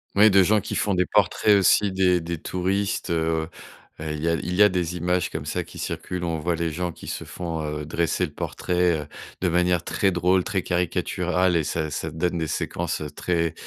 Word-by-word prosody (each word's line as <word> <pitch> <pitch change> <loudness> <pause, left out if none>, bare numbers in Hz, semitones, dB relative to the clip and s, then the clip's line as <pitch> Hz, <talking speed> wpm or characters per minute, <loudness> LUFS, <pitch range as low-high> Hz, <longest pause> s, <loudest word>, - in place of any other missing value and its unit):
Oui, 105 +1 +7
de 95 0 +6
gens 105 +2 +3
qui - - -5
font 100 -2 +1
des 90 0 +2
portraits 105 -2 +3
aussi 100 +1 +4
des 90 -2 +2
des 85 0 -4
touristes, 95 +1 -1
heu 80 -1 0 0.5
heu, 75 -1 -4
il 75 - -5
y - - 0
a 85 - +2
il 90 +4 -3
y 105 - +6
a 105 - +6
des 90 -1 -2
images 90 +1 0
comme - - -5
ça - - -2
qui - - -13
circulent. 90 -1 -4
On 80 -2 -1
voit 85 +2 0
les 85 -1 -1
gens 90 +2 -2
qui - - -12
se - - -4
font, 85 -3 -5
heu, 75 0 -4
dresser 85 +3 0
le 75 - -9
portrait, 90 -2 0
heu, 75 - -9 0.3
de 90 - +2
manière 90 0 +2
très 95 -3 +1
drôle, 90 +1 +2
très 95 -3 -1
caricaturale 90 0 0
et 80 - +1
ça 80 0 -2
ça 80 - -3
donne 85 +2 -1
des 80 - -1
séquences 80 +2 -2
très, 85 -2 0
90 Hz, 220 wpm, -24 LUFS, 80-90 Hz, 0.5 s, Oui